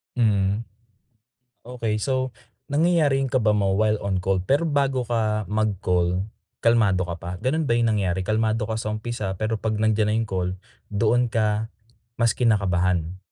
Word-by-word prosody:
Hmm. 105 -2 +1 1.0
Okey, 115 -3 -2
so, 130 -2 -1 0.3
nangyayari 150 -2 +2
yung 135 - -2
kaba 110 -5 +3
mo, 100 -2 +1
while 110 0 +3
on 95 -2 0
call, 95 -1 0
pero 145 - +2
bago 135 -4 0
ka 110 -3 0
mag-call, 95 -3 0 0.3
kalmado 105 -6 +3
ka 85 - -3
pa? 85 +1 -7
Gano'n 155 +5 0
ba 120 - 0
yung 115 -2 +2
nangyari? 95 -2 0
Kalmado 110 0 +1
ka 110 - -2
sa 105 -1 -3
umpisa, 110 -3 -3
pero 110 +1 -1
'pag 110 0 -2
nandiyan 110 -1 +2
na - - +1
yung 115 -2 -2
call, 90 -1 -1 0.4
doon 115 +3 +2
ka, 110 0 0 0.5
mas 115 -1 +3
kinakabahan. 95 -6 +1
110 Hz, 160 wpm, -24 LUFS, 100-120 Hz, 1.0 s, kaba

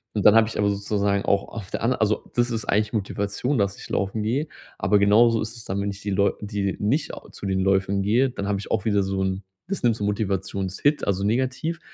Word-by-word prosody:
Und 105 - 0
dann 105 - +7
habe 115 -1 +6
ich 115 - -5
aber 105 0 +3
sozusagen 100 0 0
auch 100 0 +1
auf 105 -4 -8
der - - -3
anderen 125 +1 +1
also, 105 -1 0
das 120 0 +2
ist 115 -2 -3
eigentlich 105 +2 +1
Motivation, 105 +5 -1
dass 100 -2 0
ich - - -10
laufen 100 +2 -1
gehe, 130 +8 0 0.3
aber 105 -1 +3
genauso 115 +3 +5
ist 115 +2 -5
es 115 - -11
dann, 100 +1 -2
wenn 100 - -1
ich 100 0 -10
die 100 -1 -3
Läu 100 +1 +2
die 100 -2 -2
nicht 125 +10 0 0.2
zu - - -9
den 95 -1 0
Läufen 95 0 +1
gehe, 120 +7 +3
dann 100 -5 -5
habe 100 -1 0
ich 100 - -8
auch 95 - 0
wieder 105 -2 +2
so 95 0 -2
'n 95 0 -1 0.3
das 195 +1 -3
nimmt 120 -2 +3
so 105 - -5
Motivationshit, 100 +5 -1
also 100 -1 0
negativ, 130 +9 -1
105 Hz, 235 wpm, -24 LUFS, 100-115 Hz, 0.3 s, dann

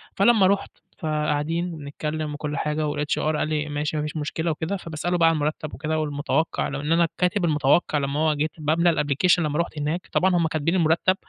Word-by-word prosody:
فلمّا 200 -1 +5
رُحت، 200 +1 0 0.3
فقاعدين 155 +2 -1
وبنتكلم 150 +1 -4
وكل 150 -1 -4
حاجة 150 0 -1
والHR 150 0 -1 0.2
قال - - 0
لي: 150 -1 -2
"ماشي، 150 +1 -2
ما 150 - -1
فيش 150 +1 -4
مشكلة 160 +2 -2
وكده." 160 +6 -3
فباسأله 175 +1 -3
بقى 165 -1 +5
على 165 - +1
المرتّب 150 0 -2
وكده 155 +2 -2
والمتوقع 150 +2 -1
ولو 140 +1 -4
إن 150 +2 -3
أنا 170 0 +4
كاتب 180 0 +1
المتوقع 150 +1 +2
لمّا 140 +1 -1
هو 155 -1 +3
جيت 150 +2 -1
باملا 160 +1 +2
الapplication 150 +6 +3
لمّا 150 -1 -1
رُحت 170 -2 -2
هناك. 155 +5 -2
طبعًا 185 0 +2
هُم 170 -2 +2
كاتبين 160 +2 0
المرتّب، 170 +2 +3
155 Hz, 195 wpm, -24 LUFS, 150-170 Hz, 0.3 s, فلمّا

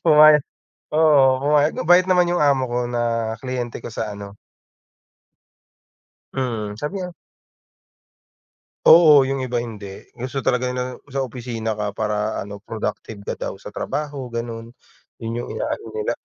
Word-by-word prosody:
Pumaya 155 -1 +8 0.5
oo, 155 -3 +5 0.2
pumayag. 150 +1 +3
Mabait 175 +2 +4
naman 180 -2 +3
yung 175 - +1
amo 135 -4 +2
ko 120 - 0
na 115 -2 -1
kliyente 125 -2 -4
ko - - -6
sa 110 -1 -4
ano 100 0 -10 2.0
Mm, 115 -6 -2
sabi 150 - -4
niya 180 -2 -5 1.7
Oo, 155 -4 +8
yung 135 +1 -2
iba 125 -2 -2
hindi. 105 -4 -8
Gusto 130 +2 -5
talaga 125 0 +1
ng 125 +1 -5
sa 135 -1 -2
opisina 120 -3 -4
ka, 105 -1 -3
para 105 -1 -1
ano, 100 0 -9
productive 110 -1 -5
ka - - -5
daw - - -4
sa 100 +1 -10
trabaho, 145 +3 -4
gano'n, 115 0 -6 0.5
yun 115 +1 -3
yung 120 - -5
inaano - - -3
nila. 440 -1 -1
125 Hz, 140 wpm, -22 LUFS, 110-145 Hz, 2.0 s, Pumaya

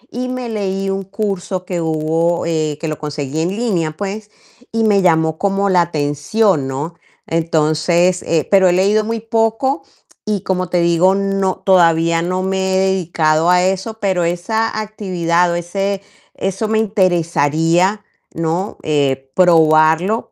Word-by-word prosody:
Y 250 +1 -3
me 255 -1 -4
leí 195 -3 -3
un 195 0 -3
curso 195 -2 -4
que 180 -2 -3
hubo, 160 +2 0
eh, 155 -3 -1
que 165 - -4
lo 155 -1 -3
conseguí 150 0 -4
en 165 - 0
línea, 195 -7 -1
pues, 205 +1 -5 0.4
y 225 0 0
me 205 -2 +3
llamó 160 -3 +2
como 200 0 0
la 180 -2 +4
atención, 155 +2 0
¿no? 145 +6 -4 0.3
Entonces, 165 +2 +1
eh, 160 -2 0
pero 190 -2 +5
he - - +2
leído 200 +4 +2
muy 225 +1 -3
poco 225 +5 0 0.4
y 210 -3 -2
como 185 -1 -2
te 180 - +1
digo, 170 +3 +3
no 195 -1 0
todavía 165 -3 +3
no 185 +2 -2
me 190 0 -1
he - - +3
dedicado 170 -4 +1
a 180 0 +4
eso, 190 +4 -1
pero 190 -4 0
esa 215 +7 -1
actividad 180 -5 0
o - - -1
ese 195 +3 -2 0.3
eso 195 +3 -2
me 220 0 +1
interesaría, 175 -2 +1 0.3
¿no? 165 +5 -2
Eh, 135 -3 -1
probarlo 165 +3 +3
180 Hz, 150 wpm, -17 LUFS, 165-200 Hz, 0.4 s, pero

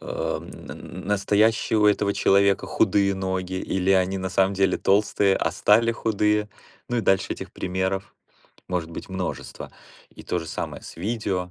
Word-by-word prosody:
м, - - -4 0.6
настоящие 105 +2 +2
у 105 - +5
этого 100 -1 +2
человека 100 0 +3
худые 100 -1 +2
ноги, 95 -1 -3
или 95 0 -1
они 95 0 +3
на 95 0 -3
самом 95 +1 +2
деле, 95 0 +2
толстые, 100 -1 +2
а - - 0
стали 115 +3 +3
худые. 105 -2 0 0.4
Ну, 120 -1 0
и - - +2
дальше 95 -3 +1
этих - - -8
примеров 95 +1 -3 0.5
может 85 -2 -2
быть 80 - -8
множество. 95 -1 -5 0.4
И - - -13
то 90 - -2
же 80 - -6
самое - - -5
с - - -10
видео. 95 -2 -2
95 Hz, 155 wpm, -24 LUFS, 95-105 Hz, 0.6 s, у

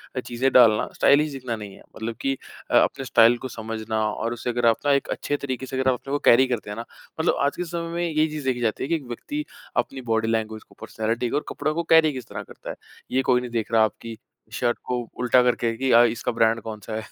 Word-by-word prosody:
अ, - - 0
चीज़ें 125 +2 -1
डालना 115 -4 +6
स्टाइलिश 150 +2 +4
दिखना 130 -4 -4
नहीं 105 -2 -9
है। - - -17
मतलब 115 +1 -5
कि 135 - +1 0.4
अ, - - +3
अपने 135 - +2
स्टाइल 115 0 +5
को - - -1
समझना 110 -2 -4
और 115 +2 -3
उसे 120 +1 -4
अगर 120 0 0
आप 115 -1 +5
ना 145 - +4
एक 140 - +1
अच्छे 145 - -2
तरीके 130 -2 -4
से 130 - -6
अगर 130 0 +2
आप - - +4
अपने 135 - -9
को 145 - 0
कैरी 130 +3 +6
करते 120 -5 -3
हैं 105 - -6
ना 115 - -5 0.3
मतलब - - +2
आज 140 - 0
के 180 - -1
समय 170 0 -4
में 175 0 -1
ये 155 0 +2
चीज़ 155 -2 -6
देखी 130 -2 0
जाती 110 -2 -1
है - - -2
कि 170 - +2
एक 155 - -4
व्यक्ति 290 - -5 0.3
अपनी 135 - -1
बॉडी 110 0 +1
लैंग्वेज़ 110 -1 -2
को - - -20
पर्सनैलिटी 115 +2 -2
को - - -2
और 150 - -3
कपड़ा 155 - -2
को 170 +2 -1
कैरी 160 -2 +6
किस 130 -3 -7
तरह - - -6
करता - - -11
है। - - -5 0.4
ये 130 - +2
कोई 125 -1 +2
नहीं 125 -1 -7
देख 115 -1 -2
रहा 115 -1 +5
आपकी 115 +1 -4 0.4
शर्ट 120 -1 0
को 125 - 0 0.2
उल्टा 125 0 +4
करके 120 -1 +1
कि 135 +2 -1
अ, 120 - +8
इसका 120 +1 0
ब्रांड 115 0 +2
कौन-सा 110 0 -7
है, 110 - -2
120 Hz, 260 wpm, -24 LUFS, 115-135 Hz, 0.4 s, अ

